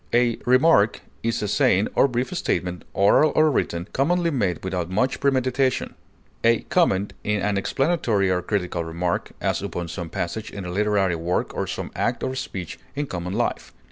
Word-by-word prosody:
A 120 -1 +3
remark 130 -4 +4 0.2
is 115 -1 -1
a - - 0
saying 105 -3 +3
or - - +4
brief 125 +6 -2
statement, 90 - -2
oral 100 +10 +4
or 155 0 +5
written, 85 -8 -1
commonly 170 +5 +2
made 100 - -1
without 90 -2 -2
much 125 +8 0
premeditation; 130 -1 +1 0.5
a 115 0 +4
comment 105 - +2
is 105 -1 0
an 105 0 +1
explanatory 115 - +1
or 90 -1 +1
critical 90 -2 -2
remark, 85 +2 -2
as - - 0
upon 85 -1 -4
some 85 -1 -5
passage 85 +5 -4
in 100 -2 -7
a 90 - -4
literary 100 -2 +1
work 85 +2 -1
or - - -2
some - - -5
act - - -1
or 130 - -1
speech 95 -9 -5 0.2
in 145 +1 -1
common 90 -6 -5
life. 120 +3 -2
105 Hz, 170 wpm, -24 LUFS, 90-130 Hz, 0.5 s, or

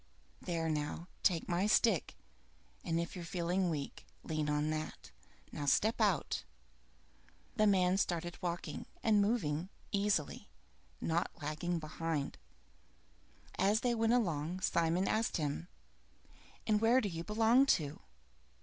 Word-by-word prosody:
There 165 -2 -2
now, 150 +1 -2 0.2
take 175 -5 +2
my 180 +3 +1
stick, 210 - +3 0.7
and 165 0 0
if 170 +2 -3
you're 180 - -6
feeling 180 +1 0
weak, 145 -4 -4 0.2
lean 155 -1 -2
on 150 +1 +1
that. 155 0 -5 0.4
Now 145 - -4
step 220 +10 +3
out!" 195 - +1 1.1
The 215 - +4
man 185 -2 +4
started 175 -2 -1
walking, 175 -1 -4 0.2
and 215 -2 +4
moved 185 -6 0 0.2
easily, 200 -7 0 0.5
not 170 +2 0
lagging 155 +3 -2
behind. 155 -2 -3 1.2
As 200 +4 +3
they 245 -1 +2
went 225 0 +2
along, 175 -6 0
Simon 170 +2 +1
asked 220 +1 +1
him, 150 +2 -2 1.0
"And 215 -1 +2
where 235 +3 +5
do 215 - -1
you 165 -3 -4
belong 225 +6 +4
to?" 150 -3 -6
175 Hz, 125 wpm, -34 LUFS, 160-210 Hz, 1.2 s, where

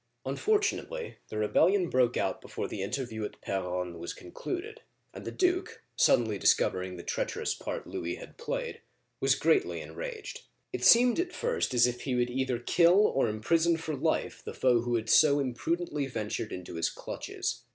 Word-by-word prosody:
Unfortunately, 440 +3 -1
the 110 - -5
rebellion 180 - +3
broke 125 -4 +2
out 95 -1 -1
before - - -5
the 100 - -5
inter 110 +7 -2
view 110 -2 -6
at 105 - -6
P6ronne 90 -2 -3
was 85 - -5
concluded, 370 - -6 0.3
and - - -9
the - - -4
duke, 365 0 0
suddenly 110 -5 +3
discovering 90 0 +2
the 85 - -8
treacherous - - -2
part - - -5
Louis 85 +1 -4
had - - -11
played, - - -4 0.4
was - - +3
greatly 390 -3 +2
enraged. 450 -5 -7 0.3
It - - -3
seemed 245 +4 +6
at 355 0 -1
first 475 - -1
as 120 0 +6
if 125 0 -2
he 130 -3 -1
would 125 0 +1
either 130 -1 0
kill 175 - +4
or 135 - +1
imprison 160 +11 +2
for 160 -2 -4
life - - -1
the - - -7
foe 125 -2 +3
who 120 0 -1
had 110 -1 -1
so 145 +5 +6
imprudently 145 +3 -1
ventured 110 -3 -4
into 90 -2 -6
his 80 - +1
clutches. - - -5
130 Hz, 170 wpm, -30 LUFS, -, 0.4 s, seemed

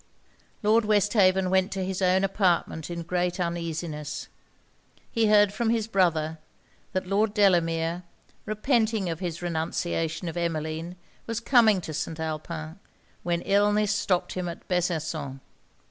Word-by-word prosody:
Lord 220 +2 +4
Westhaven 200 -3 +3
went 190 0 +2
to 190 -1 -2
his 190 0 -3
own 185 +1 +3
apartment 180 -5 0
in 170 -1 -4
great 180 +1 -1
uneasiness. 165 -3 -4 0.8
He 225 -1 +2
heard 205 -1 +5
from 235 0 0
his 225 -2 +1
brother, 160 -6 +1 0.5
that 185 - -1
Lord 205 +3 +1
Delamere, 170 -4 +2 0.5
repenting 220 -3 +1
of 165 - -5
his 175 -2 -4
renunciation 165 0 -2
of 165 - -4
Emmeline, 165 0 -3 0.3
was 230 -1 -2
coming 230 -5 +4
to 160 - -6
St. 160 +2 -4
Alpin, 160 +1 -5 0.4
when 170 -1 -1
illness 205 +1 +3
stopped 195 -3 0
him 180 -1 -3
at 170 - -9
Besançon. 160 -6 -2
180 Hz, 130 wpm, -26 LUFS, 165-205 Hz, 0.8 s, heard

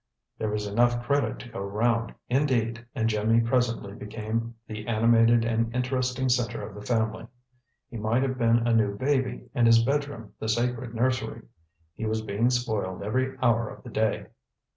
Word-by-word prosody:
There 110 - -1
was 105 0 -2
enough 120 +3 +2
credit 140 -5 +1
to 120 - -10
go 115 - -7
round, 115 +4 0
indeed, 120 -4 +1
and 115 -3 +1
Jimmy 110 +1 +2
presently 115 -3 0
became 110 +2 -4
the 105 0 -7
animated 115 0 +4
and 115 0 0
interesting 125 0 0
center 120 -2 0
of 105 - -11
the 105 - -9
family. 110 0 -1 0.6
He 120 - -8
might 110 +4 +1
have 130 -1 -2
been 115 0 +3
a 120 - +3
new 105 -3 +2
baby 130 +1 -1
and 120 -4 +3
his 115 0 +6
bedroom 140 -4 -2
the 110 - -3
sacred 120 +1 -1
nursery. 130 +1 -1 0.5
He 110 - -4
was 110 0 -1
being 110 +3 +1
spoiled 110 -7 -1
every 130 +6 -1
hour 115 -2 +3
of - - -11
the 120 - -9
day. 110 0 0
115 Hz, 170 wpm, -27 LUFS, 110-125 Hz, 0.6 s, his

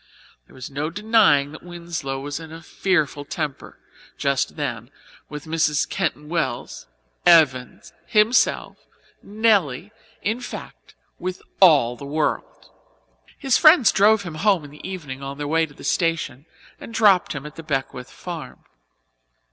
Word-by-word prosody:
There - - -18
is 130 +1 -8
no 145 +3 -3
denying 205 -7 +3
that 155 - -11
Winslow 170 -6 -5
was 145 +2 -5
in 160 -1 -10
a 165 0 -10
fearful 155 -6 -1
temper 145 -1 -5 0.4
just 140 -1 0
then 120 -6 -4 0.4
with 150 0 -8
Mrs. 155 -2 +1
Keyton 165 -5 -3
Wells, 165 - -3 0.4
Evans, 140 -8 +3
himself, 215 +3 +2 0.4
Nelly 205 - +1 0.3
in 225 +4 -1
fact, - - -10 0.2
with 185 +1 -5 0.2
all 145 -10 +5
the 120 - -12
world. 150 +2 -3 0.7
His 270 -3 +2
friends 310 -5 +7
drove 210 +1 +4
him 170 -4 -7
home 195 -5 +3
in 145 - -11
the 150 +5 -9
evening 145 -8 -7
on 140 0 -6
their 145 0 -4
way 160 +1 +1
to 145 - -17
the - - -13
station 165 -5 -1 0.3
and - - -10
dropped 200 -5 +4
him 140 -1 -7
at 150 - -9
the - - -8
Beckwith 135 -4 -4
farm. 170 +2 -9
160 Hz, 145 wpm, -22 LUFS, 140-190 Hz, 0.7 s, friends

